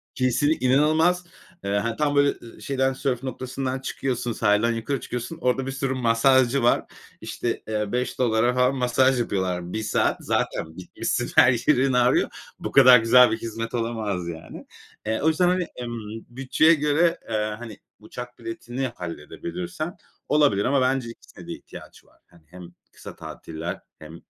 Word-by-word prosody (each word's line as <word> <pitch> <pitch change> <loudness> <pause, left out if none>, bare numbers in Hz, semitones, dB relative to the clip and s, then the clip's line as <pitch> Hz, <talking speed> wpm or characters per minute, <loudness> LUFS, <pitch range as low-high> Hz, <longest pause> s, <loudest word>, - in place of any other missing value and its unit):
Kesinl 135 +4 +2
inanılmaz. 155 +7 +3 0.4
Eee, 100 - -2
ha, 115 +2 -1
tam, 145 -1 0
böyle, 145 0 +4
ııı, 115 - -13
şeyden, 135 -1 0
sörf 130 -1 -2
noktasından 130 0 -4
çıkıyorsun, 125 -2 -3
sahilden 105 +2 +2
yukarı 115 +4 -2
çıkıyorsun. 125 +8 -5
Orada 130 0 +1
bir 135 - -3
sürü 135 0 -2
masajcı 130 +1 +3
var. 120 - +3 0.4
İşte, - - -4
eee, 105 -1 -2
$5'a 125 -1 +1
falan 125 +1 +2
masaj 130 +1 +2
yapıyorlar 90 -5 -2
1 110 - -2
saat. - - +1
Zaten 80 0 -2
bitmişsin 90 - -3
her 125 - +7 0.2
yerin 135 -2 +3
ağrıyor. 125 0 +3 0.3
Bu - - -5
kadar 130 -2 +8
güzel 120 +2 +6
bir 110 - 0
hizmet 115 0 -5
olamaz 110 -6 -2
yani. 80 -2 -8 0.4
E, 110 +1 -1
o 155 - +1
yüzden, 160 +3 +3
hani, 180 -1 +1
emm, 115 -2 -7
bütçeye 135 +6 +3
göre, 160 +3 +2
eee, 105 -1 -1
hani, 115 -4 -9 0.2
uçak 125 0 -9
biletini 120 +3 -4
halledebilirsen 170 - -6 0.3
olabilir 145 -10 +3
ama 135 +1 +2
bence 130 -2 0
ikisine 115 - -13
de - - -6
ihtiyaç - - -13
var. - - -28
Hani, 85 -2 -22
hem 90 +1 -12 0.3
kısa - - -11
tatiller 85 +3 -7 0.2
hem, 80 +2 -11
125 Hz, 155 wpm, -24 LUFS, 110-135 Hz, 0.4 s, kadar